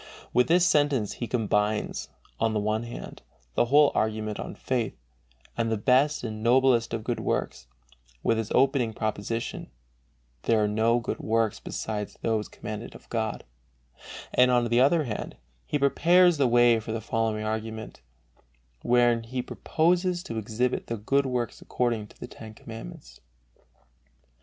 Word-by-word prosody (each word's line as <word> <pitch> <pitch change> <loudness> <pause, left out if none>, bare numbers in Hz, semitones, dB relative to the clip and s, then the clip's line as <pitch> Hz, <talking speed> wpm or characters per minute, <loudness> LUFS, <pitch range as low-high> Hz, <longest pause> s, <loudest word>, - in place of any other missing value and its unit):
With 125 - +4
this 175 +2 +4
sentence 145 - +2
he 120 - -5
combines, 105 -3 -1 0.3
on 115 -1 +1
the - - +2
one 110 +1 0
hand, 120 0 -8 0.3
the - - +3
whole 145 +3 +5
argument 110 -1 -1
on - - -6
faith, 120 -5 -2 0.6
as 115 -1 0
the 110 - 0
best 130 +7 +2
and 110 -2 -5
noblest 120 0 +3
of 110 - -5
good 120 +1 -2
works, - - -2 0.6
with 115 - +2
his 110 - -4
opening 130 -3 +2
proposition 110 - -3 0.8
(there 110 -2 +3
are - - +2
no 110 +3 +2
good 115 - -4
works 115 -1 0
besides 105 -2 -5
those 110 -2 0
commanded 110 +2 -7
of - - -14
God), 110 -2 -2 0.9
and, 125 0 +5
on 120 -1 +2
the 120 +2 +4
other 155 +4 +4
hand, 115 -6 -5 0.3
he - - 0
prepares 170 +5 +4
the 140 -2 +3
way 120 -1 +5
for 110 0 -6
the 115 - -2
following 110 -1 -1
argument, 110 0 -5 0.8
wherein 120 -1 +3
he 125 +2 -4
proposes 175 +5 0
to 115 -1 -4
exhibit 115 +4 -1
the 115 - -3
good 135 +6 +1
works 125 -3 -3
according 115 -4 -1
to - - -21
the - - -6
Ten 110 -2 -11
Commandments. 65 - -10
115 Hz, 150 wpm, -27 LUFS, 110-125 Hz, 0.9 s, whole